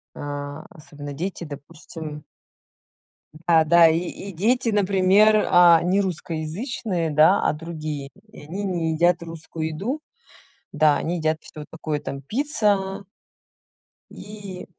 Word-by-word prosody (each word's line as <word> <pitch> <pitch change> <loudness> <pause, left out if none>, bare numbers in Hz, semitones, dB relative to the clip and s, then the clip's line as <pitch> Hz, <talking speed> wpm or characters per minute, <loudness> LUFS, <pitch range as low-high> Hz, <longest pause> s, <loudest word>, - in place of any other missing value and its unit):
а 145 0 -6
особенно 145 -5 -10
дети, 175 +5 -4
допустим 150 0 -9 1.2
а, 165 -2 +5
да, 170 +1 +6
и 160 +1 +2
и 185 +3 -6
дети, 230 +8 +1
например, 205 +1 +4
а, 175 -2 +7
не 185 +3 +2
русскоязычные, 175 - -3
да, 155 +6 +5
а - - +2
другие. 155 -3 -6 0.2
И - - -12
они 180 +7 -5
не 170 -4 -1
едят 175 +2 +2
русскую 165 -1 -6
еду. 205 - -3 0.7
Да, 150 -1 +3
они 175 +2 -2
едят 155 -1 0
всё 150 -1 -10
такое 155 -2 -3
там 140 -1 -6
пицца 200 - -1 1.1
и 205 -3 -9
170 Hz, 120 wpm, -23 LUFS, 155-195 Hz, 1.2 s, а